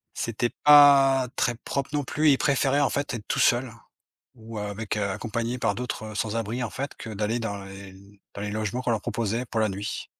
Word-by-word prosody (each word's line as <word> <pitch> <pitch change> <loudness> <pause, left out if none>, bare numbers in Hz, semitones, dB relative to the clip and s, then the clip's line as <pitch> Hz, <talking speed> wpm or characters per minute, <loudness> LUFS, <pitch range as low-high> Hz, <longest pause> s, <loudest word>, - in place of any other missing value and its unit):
c'était 115 +1 -1
pas 140 -3 +7
très 120 - 0
propre, 140 +3 -4
non 145 -1 0
plus. 150 +4 +2
Ils 135 - +5
préféraient, 140 0 +2
en 145 - +3
fait, 140 -1 -2
être 110 -3 -6
tout - - -1
seuls, 120 0 +3 0.6
ou 115 -1 -10
avec, 105 +1 -4
heu, 100 -1 -1
accompagné 115 +4 -3
par - - 0
d'autres 110 -3 -5
sans-abris, 115 +3 -2
en 115 - -3
fait, 140 +2 -5
que 115 - -9
d'aller 105 +3 -1
dans 100 -3 -4
les 95 0 -10 0.4
dans 100 - -7
les 105 0 -3
logements 110 +3 -2
qu'on 125 - -1
leur 110 -2 0
proposait 115 +1 -2
pour 115 - -3
la 110 - +2
nuit. 100 +2 -5
115 Hz, 205 wpm, -26 LUFS, 105-130 Hz, 0.6 s, pas